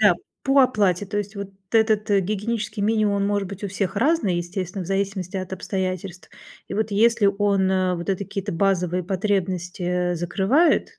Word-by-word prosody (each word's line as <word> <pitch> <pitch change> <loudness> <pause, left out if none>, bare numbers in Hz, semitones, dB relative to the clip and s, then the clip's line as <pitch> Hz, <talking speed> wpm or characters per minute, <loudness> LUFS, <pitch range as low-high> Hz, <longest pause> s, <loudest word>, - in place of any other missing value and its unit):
Да, - - +6 0.3
по 275 0 +4
оплате. 205 -6 +2
То 205 +1 -4
есть 205 0 -5
вот 200 -1 -5 0.2
этот, 220 -1 +2
э, 200 - +4
гигиенический 210 +2 -2
минимум 215 -1 +2
он 200 - +1
может 200 -2 0
быть 200 +1 -7
у 200 - -2
всех 195 0 -2
разный, 240 - +2
естественно, 180 +1 -4
в - - -9
зависимости 195 -1 -2
от 185 0 -5
обстоятельств. 185 -1 -4 0.4
И - - -4
вот 215 0 -1
если 225 +1 +3
он, 200 -1 +2
а, 185 -1 +1
вот 175 +3 -3
эти 195 +1 -1
какие-то 200 +1 -4
базовые 180 0 +1
потребности, 190 -2 -1
э, 180 0 0
закрывает, 230 - +2
195 Hz, 180 wpm, -23 LUFS, 185-210 Hz, 0.4 s, Да